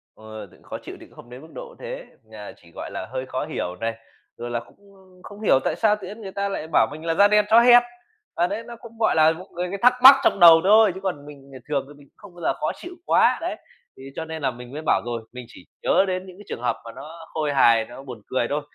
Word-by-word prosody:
Ờ, 110 -2 -11
khó - - -7
chịu - - -9
thì - - -13
cũng - - -22
không 120 - -15
đến 125 +2 -11
mức 160 - -14
độ - - -9
thế, - - -7 0.3
ờ, 105 -1 -10
chỉ, 85 -1 -21
gọi - - -7
là, 95 - -6
hơi 130 0 -4
khó 130 0 -4
hiểu 90 0 -5
này, 115 0 -1 0.4
rồi 120 0 -6
là 120 - -1
cũng, 120 - -18 0.2
ưm, 185 -1 -22
không 205 +1 -12
hiểu 135 -10 +3
tại - - 0
sao 215 -2 +2
tự 195 -3 -10
nhiên 215 +3 -10
người 190 -2 -8
ta 200 +1 -3
lại 160 -5 -5
bảo 110 -6 +4
mình 155 +2 -9
là 165 - 0
"Da 200 +4 +5
đen 210 0 +3
chó 225 +1 +7
hen." 245 0 +7 0.5
À, 175 +1 +1
đấy, 215 +5 -5
nó 235 0 -10
cũng, 230 -1 -15
gọi 220 - +2
là, 160 0 +5
một 180 +4 -9
cái 180 +2 -3
thắc 250 +1 +6
mắc 270 +1 +11
trong - - +2
đầu 165 -1 +8
thôi, 215 0 +5
chứ - - -7
còn 160 -7 -4
mình, 140 -2 -14
ờ, 130 - -10
thường 140 -2 -1
thì - - -12
mình 145 -1 -19
cũng - - -51
không 205 -4 -15
bao 175 - -13
giờ - - 0
khó - - -1
chịu 355 +1 -10
quá. - - +3
Đấy, - - -3 0.4
thế 130 - -13
cho 160 - -5
nên 160 -1 -7
là 130 -2 0
mình 125 +1 -12
mới 155 - -6
bảo 95 - +2
rồi, 120 -1 -4
mình 125 -1 -9
chỉ 90 -7 -16 0.2
nhớ 195 - +3
đến 185 0 -3
những 185 -1 -13
cái 205 - -14
trường - - -6
hợp 125 - 0
mà 115 - -8
nó 160 +5 -11
khôi 150 -2 -2
hài, 115 -4 +4
nó 120 +3 -12
buồn 125 -5 -10
cười 130 -2 -1
thôi. 150 +1 -1
160 Hz, 290 wpm, -23 LUFS, 125-200 Hz, 0.5 s, mắc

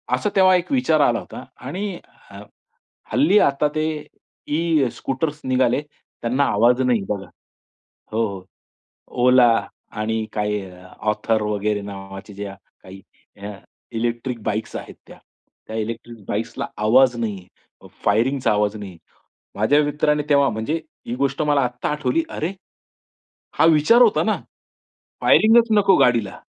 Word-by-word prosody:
असं 210 - -1
तेव्हा 185 -1 +6
एक 180 +5 -2
विचार 250 - +2
आला 120 -4 +3
होता - - -10 0.2
आणि 190 +6 -3 0.4
ह 100 - -10 0.7
हल्ली 150 - +4
आता 140 -4 +2
ते 155 - 0 0.7
ई-स्कूटर्स 150 -2 -1
निघाले 130 0 +2
त्यांना 140 -2 -3
आवाज 120 +4 +3
नाही 125 -5 +2
बघा. 100 -2 -3 0.9
हो, 115 +1 +1
हो. 95 -2 -8 0.8
ओला 125 -1 +6 0.5
आणि 110 +1 -1
काही 105 -1 -1 0.5
ऑथर 110 +1 -1
वगैरे 105 0 -1
नावाच्या 95 0 -9
ज्या 100 -1 -6 0.3
काही 95 +1 -12 0.4
अ, 105 +1 -5 0.4
इलेक्ट्रिक 120 +1 -3
बाईक्स 110 +1 -3
आहेत - - -8
त्या. - - -14 0.5
त्या 110 - -5
इलेक्ट्रिक 115 0 -6
बाइक्सला 115 +3 -3 0.2
आवाज 125 +2 +5
नाही. 100 -5 -4 0.6
फायरिंगचा 120 +6 +2
आवाज 105 0 0
नाही. 100 -4 -9 0.6
माझ्या 120 +9 +3
मित्राने 150 0 +1
तेव्हा 140 -2 +4
म्हणजे 115 +9 -2 0.3
ही 120 - -3
गोष्ट 140 +2 -1
मला 145 -2 +2
आता 125 0 -2
आठवली. 150 - 0
"अरे, 165 +5 -3 1.1
हा - - +5
विचार 165 +10 +5
होता 225 -3 +4
ना? 215 - +1 0.9
फायरिंगच 230 +2 +5
नको 200 -3 +5
गाडीला 115 -5 +2
125 Hz, 130 wpm, -21 LUFS, 105-150 Hz, 1.1 s, तेव्हा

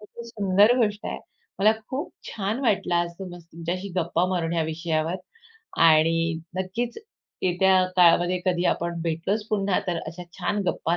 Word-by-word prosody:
किती 220 +3 -11
सुंदर 205 +1 +4
गोष्ट 210 -3 0
आहे. - - -4 0.4
मला 210 +2 +5 0.2
खूप 270 +3 -4 0.2
छान 210 +4 -3
वाटलं 205 -8 +1
आज 170 0 +1
तुमच्या 180 -2 -7
तुमच्याशी 175 +4 -4
गप्पा 170 0 +1
मारून 170 -3 -1
या 165 -1 +1
विषयावर 160 +1 -1 0.7
आणि 165 +1 +4 0.2
नक्कीच 230 - -3 0.4
येत्या 185 +1 +4
काळामध्ये 175 0 +5
कधी 180 -1 +1
आपण 170 0 -4
भेटलोच 170 +6 -1
पुन्हा 200 -3 +1
तर 175 -2 -1
अशा 170 +3 -7 0.2
छान 200 +2 -1
गप्पा 170 -1 0
180 Hz, 150 wpm, -25 LUFS, 170-200 Hz, 0.7 s, मला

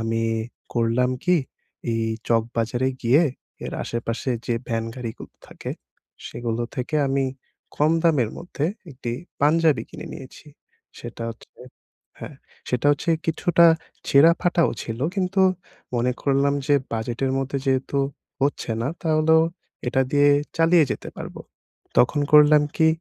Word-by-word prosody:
আমি 115 0 -1 0.5
করলাম 120 +2 +1
কি 180 0 +4 0.5
এই 115 0 0 0.3
চকবাজারে 115 +2 0
গিয়ে 130 +7 +5 0.4
এর - - -5
আশেপাশে 115 +2 -3 0.2
যে 120 - +1
ভ্যান 115 -1 -1
গাড়িগুলো 115 -3 -8
থাকে - - -8 0.6
সেগুলো 120 -1 -3
থেকে 135 +5 -2
আমি 135 0 +1 0.5
কম 150 +2 +3
দামের 150 -9 +3
মধ্যে 170 -4 -4 0.3
একটি 125 -3 -6 0.3
পাঞ্জাবি 150 -3 +3
কিনে - - -9
নিয়েছি। 135 +3 -11 0.5
সেটা - - -8
হচ্ছে 115 - -14 0.7
হ্যাঁ, - - -9 0.3
সেটা 125 +2 0
হচ্ছে 145 +4 -2 0.2
কিছুটা 170 +1 +3 0.4
ছেঁড়া-ফাটাও 170 +3 +4
ছিল 115 0 -5 0.2
কিন্তু 190 0 0 0.5
মনে 120 +1 +1
করলাম 140 0 +2
যে 145 - +4 0.2
বাজেটের 120 +4 -2
মধ্যে 135 +1 -2
যেহেতু 135 +1 0 0.4
হচ্ছে 140 -4 0
না, 120 - -1
তাহলেও 160 0 +4 0.5
এটা 130 +2 +1
দিয়ে 145 0 +4 0.3
চালিয়ে 165 0 +5
যেতে - - -7
পারবো। - - -8 0.6
তখন 145 +4 +4
করলাম 150 0 +7
কি 160 - +4
135 Hz, 125 wpm, -23 LUFS, 120-155 Hz, 0.7 s, করলাম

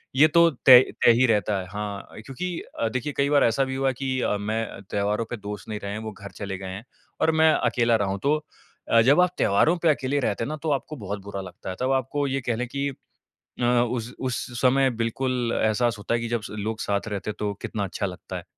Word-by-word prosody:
ये 150 +4 +7
तो 170 +2 +5 0.2
तय 125 -2 +11 0.2
तय 120 - +9
ही 130 - +5
रहता 105 -2 +1
है। 90 - -6
हाँ, 105 -1 -5 0.2
क्योंकि 170 +6 -4 0.2
अ, 115 - +1
देखिए 130 +5 -3
कई 140 0 +2
बार 145 -1 +4
ऐसा 115 +4 +3
भी 130 0 -3
हुआ 135 0 +1
की 130 0 -2 0.2
मैं 110 -1 -3
त्योहारों 105 +2 0
पे 120 - -4
दोस्त 105 0 -7
नहीं 105 -1 -4
रहे 100 - -4
हैं 110 - -4
वो 110 - -5
घर 100 0 -11
चले 100 -2 -5
गए 95 0 -7
हैं 95 +4 -7 0.4
और 160 - +4
मैं 160 0 +5
अकेला 120 -1 +2
रहा 100 -3 0
हूँ। 100 +1 -2
तो 145 +2 +3 0.5
अ, 115 - +6
जब 140 +9 +5
आप 180 - +4
त्योहारों 155 - +3
पे 165 - +5
अकेले 145 -1 +1
रहते 115 -4 -1
हैं 125 - -3
ना 155 - -4
तो 160 - 0
आपको 145 +2 -2
बहुत 100 -5 -5
बुरा 100 -1 -5
लगता 90 -1 -9
है। 95 - -4
तब 130 +1 0
आपको 135 +2 0
ये 135 0 -1
कह 120 - +2
लें 125 +2 -3
की 140 +3 -2 0.5
अ, - - -9
उस 120 0 +1
उस 125 -2 -2 0.2
समय 135 +1 +4
बिल्कुल 125 0 -1
एहसास 110 +1 +1
होता 105 +3 -3
है - - 0
कि 115 - -3
स - - -9
जब 110 -3 -3
लोग 110 +2 -3
साथ 100 +1 -1
रहते 105 -1 -4
हैं 105 - -4
तो 105 -1 -1
कितना 105 - -3
अच्छा 100 +2 -3
लगता 90 -2 -6
है। - - -7
115 Hz, 245 wpm, -25 LUFS, 105-135 Hz, 0.5 s, तय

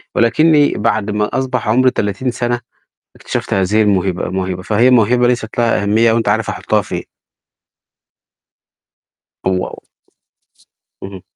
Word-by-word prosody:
ولكنّي 150 +5 +3
بعد 105 -1 -1
ما 105 +4 -1
أصبح 130 -4 -3
عمري 130 +3 +3
30 105 +5 -2
سَنة، 120 0 -2 0.6
اكتشفت - - -4
هذه 95 +3 +2
الموهبة 95 -3 0
الموهبة، 95 0 -3
فهي 110 +5 +2
الموهبة 125 0 +3
ليست 120 -3 -2
لها 115 -3 +1
أهمية 110 +3 +3
وأنت 115 -2 0
عارف 110 +1 0
أحُطّها - - -1
فين. - - -5 2.4
واو! 95 -1 -2 1.2
اهم. 95 -1 -9
110 Hz, 115 wpm, -16 LUFS, 100-120 Hz, 2.4 s, ولكنّي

